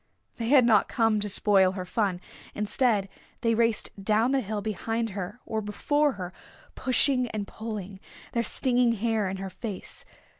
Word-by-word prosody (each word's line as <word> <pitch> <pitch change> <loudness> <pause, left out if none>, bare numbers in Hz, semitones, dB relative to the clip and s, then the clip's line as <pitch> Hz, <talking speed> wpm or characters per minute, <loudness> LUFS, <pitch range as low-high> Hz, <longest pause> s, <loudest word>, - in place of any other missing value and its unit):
They 230 - -3
had 260 -1 +6
not 220 -4 +4
come 225 -3 +2
to 210 0 -2
spoil 195 -2 +4
her 185 -1 -5
fun. 185 -2 -1 0.3
Instead 210 -1 +1 0.3
they 230 -1 +2
raced 230 -1 +2
down 220 +5 +2
the 275 -1 +2
hill 210 -1 -3
behind 225 +2 -2
her 195 +4 -6
or 220 -1 -2
before 290 +8 +1
her, 185 -3 -7 0.4
pushing 255 0 +2
and 215 -2 -4
pulling, 205 -3 -7 0.3
their 235 - 0
stinging 245 +1 +2
hair 220 -2 0
in 190 - -4
her 190 0 -6
face. 210 -4 -7
220 Hz, 160 wpm, -27 LUFS, 200-235 Hz, 0.4 s, had